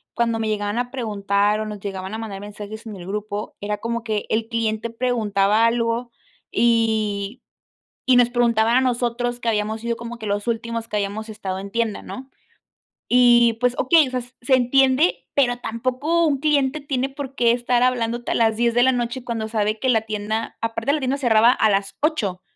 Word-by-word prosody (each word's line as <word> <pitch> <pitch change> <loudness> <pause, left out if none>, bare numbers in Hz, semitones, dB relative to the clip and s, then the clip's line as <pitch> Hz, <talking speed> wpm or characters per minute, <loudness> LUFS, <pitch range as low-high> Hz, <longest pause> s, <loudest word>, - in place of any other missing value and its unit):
cuando 230 -1 0
me 220 - -1
llegaban 205 0 -2
a 245 0 -2
preguntar 205 -4 0
o 215 - -2
nos 210 -1 -6
llegaban 195 0 -6
a - - -3
mandar 210 -3 -6
mensajes 210 +2 -9
en 215 - -7
el 180 -2 -9
grupo, 210 +1 -4
era 210 +1 -2
como 230 +2 -3
que 215 -2 -2
el 220 0 0
cliente 225 -1 -1
preguntaba 225 -3 +1
algo 230 +1 0 0.4
y 220 -2 +1 0.7
y 255 -1 +6
nos 245 -1 +5
preguntaba 235 -1 +2
a - - +4
nosotros, 245 -1 -1
que 235 - -1
habíamos 215 0 -1
sido 235 0 -2
como 235 +1 -7
que 215 - -6
los 205 +2 -2
últimos 230 0 -2
que 210 - -2
habíamos 205 +2 -3
estado 205 -4 -5
en 195 +1 -7
tienda, 230 -2 -1
¿no? 260 +1 -9 0.8
Y, 240 -1 +5
pues, 250 +2 0
okey, 305 +1 +4
o - - -8
sea, 255 - -1
s 245 +1 -14
se 260 +2 +3
entiende, 260 +5 +3
pero 245 -4 +2
tampoco 255 +9 0
un 280 -3 0
cliente 290 -1 +1
tiene 270 -2 -1
por 275 -1 -7
qué 235 -1 +4
estar 240 0 +1
hablándote 240 -1 0
a - - 0
las 225 -1 +2
10 235 0 +1
de 245 - +4
la 260 +1 +5
noche 245 +1 -3
cuando 225 -3 -3
sabe 215 -1 0
que 260 - -1
la 225 -3 +3
tienda 215 +1 -3
aparte, 230 +3 -1
la 305 - +1
tienda 265 -1 -1
cerraba 235 -3 +4
a 220 -4 +2
las 195 0 -1
8, 210 - -1
230 Hz, 200 wpm, -22 LUFS, 215-245 Hz, 0.8 s, y